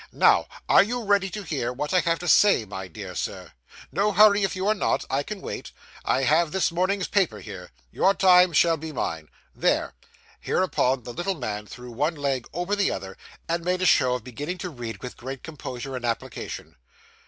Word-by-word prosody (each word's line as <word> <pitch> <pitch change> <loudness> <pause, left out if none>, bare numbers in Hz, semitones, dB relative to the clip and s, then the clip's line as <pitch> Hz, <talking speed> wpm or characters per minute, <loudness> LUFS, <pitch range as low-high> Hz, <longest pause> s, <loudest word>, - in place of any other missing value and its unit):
Now, - - +4 0.2
are - - +7
you 240 +3 -1
ready 200 -2 +2
to 205 +2 -6
hear 140 -8 -2
what 150 +7 -4
I 185 - +5
have 165 -1 +1
to 175 - -7
say, 200 - +5
my 95 -2 -7
dear 80 - -8
Sir? - - -5 0.4
No 210 +1 +1
hurry; 205 +1 +6
if 195 - 0
you 190 +1 -2
are 215 - +4
not, 200 - 0
I 135 - +1
can 200 +6 -7
wait. - - -6 0.3
I 135 - +1
have 155 +3 +3
this 190 0 +1
morning's 185 +3 0
paper 195 -4 +1
here. 90 -1 -9 0.2
Your 195 - +3
time 180 -1 +6
shall 165 +1 +4
be 160 +1 -7
mine. 80 - -4 0.2
There!' - - +1 0.5
Hereupon, 135 -8 0
the 120 - -7
little 180 +5 -2
man 105 -7 -5
threw 125 +2 -10
one 150 +8 -1
leg 140 -4 -2
over 175 +5 -1
the 205 -1 +2
other, 95 0 -5 0.3
and 170 0 -1
made 180 +1 0
a - - +2
show 125 -7 +4
of 125 - -5
beginning 145 +9 -5
to 180 - -4
read 115 -7 -7
with 125 - -7
great 135 +1 -7
composure 135 -4 -6
and 125 - -6
application. 115 -1 -5
160 Hz, 200 wpm, -25 LUFS, 125-185 Hz, 0.5 s, are